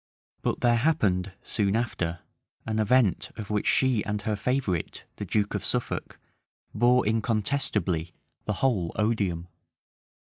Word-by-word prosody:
But -, -, -1 dB
there 120 Hz, -1 st, +4 dB
happened, 105 Hz, -, +1 dB
soon 100 Hz, -1 st, 0 dB
after, 90 Hz, -8 st, -2 dB, 0.4 s
an 110 Hz, -1 st, -1 dB
event 110 Hz, -2 st, +3 dB
of 105 Hz, -1 st, -6 dB
which 105 Hz, -1 st, 0 dB
she 130 Hz, -5 st, +3 dB
and 105 Hz, -1 st, -2 dB
her 105 Hz, 0 st, 0 dB
favorite, 105 Hz, -, -2 dB
the -, -, -4 dB
duke 105 Hz, -1 st, 0 dB
of -, -, -2 dB
Suffolk, -, -, -2 dB, 0.6 s
bore 125 Hz, +1 st, +4 dB
incontestably 105 Hz, -, 0 dB, 0.3 s
the 105 Hz, -, 0 dB
whole 95 Hz, -11 st, +1 dB
odium. 100 Hz, -6 st, 0 dB
105 Hz, 130 wpm, -27 LUFS, 95-120 Hz, 0.6 s, there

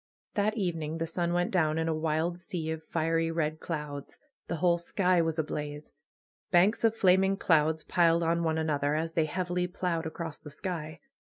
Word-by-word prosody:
That 215 Hz, +2 st, +1 dB
evening 165 Hz, -5 st, -2 dB
the 165 Hz, -, -1 dB
sun 170 Hz, +1 st, -1 dB
went 175 Hz, 0 st, +1 dB
down 160 Hz, -4 st, +2 dB
in 160 Hz, 0 st, 0 dB
a 165 Hz, -, +1 dB
wild 160 Hz, +2 st, -1 dB
sea 170 Hz, -2 st, -4 dB
of 160 Hz, 0 st, -4 dB
fiery 165 Hz, +1 st, 0 dB
red 155 Hz, -1 st, -1 dB
clouds. 150 Hz, -4 st, -5 dB, 0.3 s
The -, -, -2 dB
whole 170 Hz, +1 st, +2 dB
sky 180 Hz, 0 st, +2 dB
was 165 Hz, -1 st, -1 dB
ablaze. 150 Hz, -1 st, -4 dB, 0.6 s
Banks 190 Hz, +7 st, +4 dB
of 225 Hz, -1 st, +4 dB
flaming 190 Hz, -1 st, +4 dB
clouds 160 Hz, -3 st, +2 dB
piled 170 Hz, -1 st, +3 dB
on 170 Hz, +1 st, +1 dB
one 160 Hz, -1 st, +1 dB
another, 150 Hz, -2 st, 0 dB
as 165 Hz, +1 st, -2 dB
they 160 Hz, -1 st, +2 dB
heavily 180 Hz, +2 st, -1 dB
ploughed 175 Hz, -2 st, -2 dB
across 160 Hz, -1 st, -6 dB
the 150 Hz, -, -10 dB
sky. 155 Hz, -1 st, -5 dB
165 Hz, 180 wpm, -29 LUFS, 155-175 Hz, 0.6 s, Banks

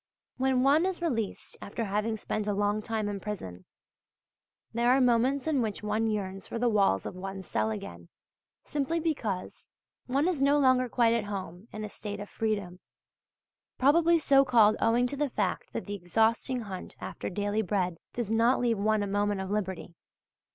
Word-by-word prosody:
When 260 Hz, -1 st, +2 dB
one 300 Hz, +6 st, +4 dB
is 380 Hz, -2 st, -2 dB
released 240 Hz, -, -3 dB
after 230 Hz, +3 st, -4 dB
having 210 Hz, +2 st, -1 dB
spent 215 Hz, 0 st, -3 dB
a 205 Hz, -, 0 dB
long 205 Hz, +1 st, +1 dB
time 215 Hz, -1 st, -2 dB
in 205 Hz, -1 st, -3 dB
prison, 95 Hz, -, -6 dB, 1.1 s
there 235 Hz, +1 st, +2 dB
are 260 Hz, +2 st, +5 dB
moments 250 Hz, +2 st, +2 dB
in 305 Hz, -5 st, +1 dB
which 215 Hz, -2 st, -3 dB
one 215 Hz, +2 st, 0 dB
yearns 195 Hz, -3 st, -3 dB
for -, -, -4 dB
the 240 Hz, +1 st, +1 dB
walls 195 Hz, -, +2 dB
of -, -, -5 dB
one's 190 Hz, 0 st, -6 dB
cell 110 Hz, 0 st, 0 dB
again, 85 Hz, -5 st, -7 dB, 0.5 s
simply 295 Hz, +3 st, -1 dB
because 230 Hz, -, -3 dB, 0.4 s
one 275 Hz, +6 st, +1 dB
is 345 Hz, -7 st, 0 dB
no 280 Hz, +1 st, +4 dB
longer 255 Hz, -3 st, +3 dB
quite 235 Hz, -1 st, +3 dB
at 230 Hz, -3 st, 0 dB
home 195 Hz, -1 st, -6 dB
in 215 Hz, -, -6 dB
a -, -, -4 dB
state 205 Hz, 0 st, -6 dB
of 205 Hz, -, -8 dB
freedom 205 Hz, -5 st, -2 dB, 1.0 s
probably 330 Hz, +5 st, +5 dB
so 275 Hz, -3 st, +5 dB
called 225 Hz, -5 st, +5 dB
owing 235 Hz, +2 st, +3 dB
to 250 Hz, -, -2 dB
the 290 Hz, 0 st, 0 dB
fact 205 Hz, -6 st, -2 dB
that -, -, -4 dB
the 205 Hz, -, -5 dB
exhausting 225 Hz, +7 st, +1 dB
hunt 195 Hz, -4 st, -7 dB
after -, -, -5 dB
daily 205 Hz, +3 st, -1 dB
bread 180 Hz, -4 st, -1 dB
does 235 Hz, -3 st, -3 dB
not 230 Hz, +3 st, +3 dB
leave 235 Hz, -4 st, +1 dB
one 215 Hz, 0 st, +2 dB
a -, -, -2 dB
moment 205 Hz, 0 st, 0 dB
of 190 Hz, 0 st, -4 dB
liberty. 190 Hz, -4 st, -3 dB
215 Hz, 180 wpm, -29 LUFS, 200-255 Hz, 1.1 s, are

